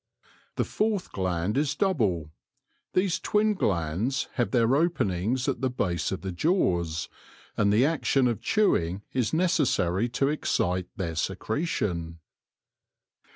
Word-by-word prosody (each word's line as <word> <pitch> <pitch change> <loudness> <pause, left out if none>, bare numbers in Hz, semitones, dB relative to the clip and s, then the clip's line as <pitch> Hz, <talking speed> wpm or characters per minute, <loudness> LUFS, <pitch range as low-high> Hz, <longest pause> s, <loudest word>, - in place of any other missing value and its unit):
The - - +1
fourth 210 -3 -1
gland 95 +4 -1
is 145 -1 0
double. 105 - 0 0.6
These 185 -1 +1
twin 210 0 +2
glands 100 - -1
have 120 - 0
their 120 0 +3
openings 125 - 0
at - - -1
the 130 - +1
base 90 -9 -1
of 95 - -3
the 95 - -4
jaws, 85 - 0 0.5
and 100 -1 +2
the 110 +6 +4
action 140 -4 +2
of 120 -3 -1
chewing 100 - +1
is 125 -4 0
necessary 120 - +1
to 135 +3 0
excite 90 - 0
their 85 -5 -3
secretion. 85 - -2
115 Hz, 125 wpm, -27 LUFS, 90-150 Hz, 0.6 s, the